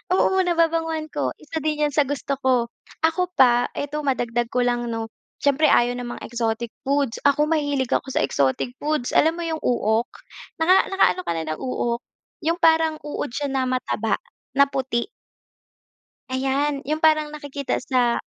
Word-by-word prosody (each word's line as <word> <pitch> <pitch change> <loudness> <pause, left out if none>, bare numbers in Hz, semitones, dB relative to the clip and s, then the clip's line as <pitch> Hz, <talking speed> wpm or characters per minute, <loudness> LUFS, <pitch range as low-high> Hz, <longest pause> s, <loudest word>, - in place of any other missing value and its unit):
oo, 380 0 +3
nababanguhan 330 -2 +1
ako. 135 -3 -1
Isa 320 +1 -5
din 300 -1 0
yan - - -5
sa 295 - +5
gusto 280 0 -2
ko. 255 -3 +2 0.4
Ako 360 +3 +1
pa, 245 -1 +5
eto 290 +1 -3
madagdag 240 -3 0
ko 250 0 +1
lang 240 -1 0
'no 225 0 -3 0.4
siyempre 285 +2 +4
ayaw 245 +1 +3
ng 245 - -5
mga - - -11
exotic 230 0 -2 0.2
foods, 275 -4 +1
ako 285 +1 +3
mahilig 285 -5 0
ako - - +1
sa - - +2
exotic 135 - 0
foods, 300 -4 -1
alam 320 +2 +4
mo 345 - -3
yung 320 -1 -2
uok? 230 -1 +1 0.5
Naka 360 +4 +4
nakaano 385 -1 +3
ka - - +1
na 165 - -2
ng - - -9
uok 240 -2 -2 0.5
yung 335 - +3
parang 320 -1 +4
uod 295 0 -3
siya 285 +4 -2
na 265 -1 0
mataba 225 -4 0 0.4
na 280 - +8
puti. 260 -3 -1 1.3
Ayan 275 +2 -1
yung 305 +3 -2
parang 310 -2 +3
nakikita 285 -2 -3
sa 250 -3 +1
275 Hz, 165 wpm, -23 LUFS, 240-310 Hz, 1.3 s, na